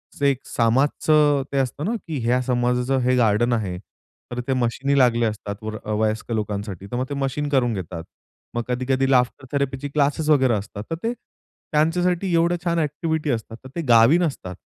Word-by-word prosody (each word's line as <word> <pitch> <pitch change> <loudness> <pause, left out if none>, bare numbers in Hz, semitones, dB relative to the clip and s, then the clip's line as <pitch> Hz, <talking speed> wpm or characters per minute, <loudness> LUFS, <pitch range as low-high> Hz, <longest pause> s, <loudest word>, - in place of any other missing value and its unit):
असं 145 - -1
एक 140 -2 +3
समाजाचं 145 +4 +3
ते 140 - -1
असतं 135 +3 -2
ना, 210 - 0 0.2
की 160 -3 -3
ह्या 125 +2 +2
समाजाचं 125 +1 +1
हे 125 +1 +2
गार्डन 120 0 +3
आहे. 100 -6 -2 0.5
तर 120 - -4
ते 135 - +1
मशीनी 130 +3 0
लागले 120 -2 +4
असतात, 105 -2 -3
वर 110 0 -4 0.2
वयस्क 110 +2 -1
लोकांसाठी, 105 -3 -3
तर - - -2
मग 130 - -1
ते - - -3
मशीन 140 +1 -2
करून 130 -4 +2
घेतात. 85 -4 -5 0.5
मग 120 - -1
कधी-कधी 130 +2 0
लाफ्टर 125 0 +2
थेरपीचे 140 0 -1
क्लासेस 145 +2 0
वगैरे 130 -5 +4
असतात, 100 0 -4
तर - - 0
ते 230 +1 0
त्यांच्यासाठी 175 -3 -2
एवढ्या 170 +1 +3
छान 170 -1 +1
एक्टिव्हिटी 155 0 -1
असतात, 115 -1 -4
तर 130 - -10
ते 170 - -1
गावी 115 +7 +7
नसतात. 135 - -3
130 Hz, 180 wpm, -23 LUFS, 115-150 Hz, 0.5 s, गावी